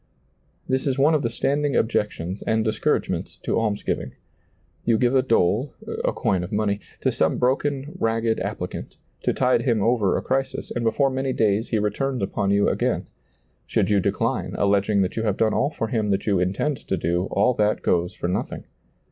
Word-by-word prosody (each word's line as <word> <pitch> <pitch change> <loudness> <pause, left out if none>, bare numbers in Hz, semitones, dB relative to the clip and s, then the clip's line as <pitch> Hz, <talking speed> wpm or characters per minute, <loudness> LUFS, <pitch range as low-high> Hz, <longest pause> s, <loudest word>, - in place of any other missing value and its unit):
This 130 +2 0
is 135 -1 0
one 145 +4 +4
of 155 - +2
the 115 - 0
standing 140 +4 0
objections 100 -4 -1
and 110 0 +2
discouragements 110 -1 -1
to - - +1
almsgiving. 105 -2 -2 0.7
You 115 -2 +3
give 120 +2 +2
a 130 - +5
dole 115 +1 +1
— - - -4
a - - +2
coin 90 -2 0
of 90 - -6
money 105 -1 0
— - - -27
to - - +2
some - - +1
broken, 135 +3 0
ragged 115 -2 +1
applicant, - - -5 0.2
to - - +1
tide 130 -1 +2
him 115 -6 +1
over 110 -5 +2
a - - -3
crisis, 135 +1 -2
and 120 - -2
before 135 +5 +2
many 130 0 -1
days 110 0 +1
he 115 - +1
returns 125 +4 -1
upon 100 0 -1
you 100 0 +3
again; - - 0 0.6
should - - +1
you 100 - +4
decline, - - -1
alleging 100 0 +2
that 90 - -3
you - - +1
have 105 -3 0
done 110 -1 +2
all 140 - +2
for 115 -7 -3
him 110 -3 0
that 100 0 0
you 100 -4 +2
intend 100 +11 0
to 95 - -3
do, 85 +2 0
all 115 +6 +3
that 105 -2 +1
goes 90 0 +1
for - - -3
nothing. 90 - -3
110 Hz, 195 wpm, -24 LUFS, 100-130 Hz, 0.7 s, a